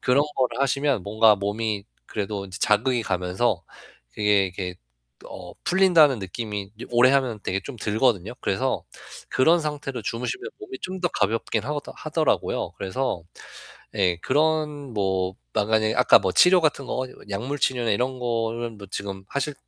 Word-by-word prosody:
그런 135 +3 +3
거를 125 -1 0
하시면 140 -4 +1
뭔가 110 +1 +5
몸이 105 +1 -2 0.2
그래도 100 -1 -3
이제 95 0 -8
자극이 115 +3 +2
가면서 90 +6 0 0.5
그게 105 -2 +3
이렇게 90 0 -5 0.5
어 - - -9
풀린다는 175 -7 +5
느낌이 100 0 -5
이제 115 - -8
오래 120 +2 +6
하면 130 -5 +1
되게 95 +1 -1
좀 140 - -7
들거든요. 110 -2 +1
그래서 - - 0 0.5
그런 165 +6 +4
상태로 145 -5 -4
주무시면 125 - -3
몸이 395 -2 -8
좀 185 0 -5
더 175 - +3
가볍긴 110 +3 0
하더 145 +1 -4
하더라고요. 155 0 0
그래서 95 0 -2 0.7
예 90 -4 +2
그런 150 - 0
뭐 95 -2 0 0.2
만약에 110 +1 +2
아까 125 - +7
뭐 95 - 0
치료 180 0 +6
같은 145 -3 +1
거 130 +1 -2 0.2
약물 125 +9 -3
치료나 120 -4 +1
이런 125 +5 0
거는 115 -1 -2
뭐 100 - -10
지금 100 -1 -5
하실 140 +1 -2
120 Hz, 325 characters per minute, -24 LUFS, 100-140 Hz, 0.7 s, 아까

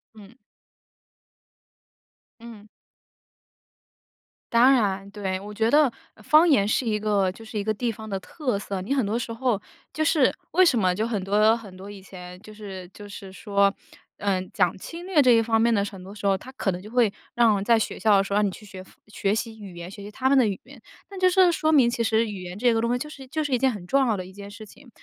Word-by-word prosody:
嗯。 210 0 -14 2.1
嗯。 225 -3 -12 1.8
当 240 +3 +6
然， 195 -5 0
对。 190 -3 -3
我 205 +2 -9
觉 220 +2 +1
得 290 -1 +4 0.3
方 310 +8 +5
言 205 -8 +4
是 220 - +1
一 210 -2 0
个 200 -3 +1
就 225 +4 -13
是 220 0 -7
一 - - -2
个 215 - 0
地 235 +2 -2
方 220 0 -10
的 195 -1 -3
特 255 - -3
色， 195 -1 -5
你 225 +9 -2
很 260 -6 +1
多 215 +3 -1
时 235 -1 -4
候 230 -3 -1 0.3
就 310 - -1
是 305 -4 +3 0.2
为 370 +2 +5
什 285 -8 +3
么 185 -2 +2
就 215 +4 -1
很 210 -5 -2
多 210 +3 +3
很 210 -5 -11
多 195 +2 -10
以 200 -1 -11
前 180 -1 -11
就 215 - -13
是 195 -4 -9
就 205 +2 -12
是 195 -1 -10
说， 200 0 +1 0.5
呃， 195 -2 0
讲 175 - +1
侵 340 - -9
略 370 -6 +3
这 255 - +4
一 230 - +5
方 225 0 +1
面 235 - +3
的 200 -1 +1
很 195 -2 -9
多 195 +2 -11
时 205 - -8
候， 195 -1 +3
它 255 +7 -9
可 210 -7 -1
能 180 0 -6
就 210 - -11
会 230 -3 +2 0.2
让 220 -5 +3
在 230 +2 +4
学 220 - -3
校 210 -2 +4
的 195 - +3
时 200 - -5
候 205 - +2
让 210 - +3
你 200 - +1
去 210 - -11
学 190 -2 -10
方 - - -20 0.2
学 205 0 -1
习 225 -1 -5
语 195 -4 -10
言， 170 +1 -8
学 200 - -11
习 200 - -8
他 260 +5 -2
们 280 - +4
的 250 - +4
语 195 -2 -3
言。 260 -1 -16 0.3
那 390 - -9
就 370 0 +4
是 365 -1 +4
说 315 -1 0
明 270 -6 +5
其 235 -1 -1
实 225 0 +2
语 200 -3 -7
言 180 +1 -8
这 240 +1 +2
个 225 - +1
东 235 - 0
西 245 - +1
就 275 - -6
是 275 -3 -11
就 310 +3 -2
是 290 - -4
一 - - +4
件 265 +1 +2
很 205 -6 -8
重 270 +6 +2
要 215 -4 +1
的 185 - -5
一 185 - -13
件 200 +1 -10
事 215 +2 -11
情。 245 +5 -17
215 Hz, 270 characters per minute, -24 LUFS, 200-245 Hz, 2.1 s, 当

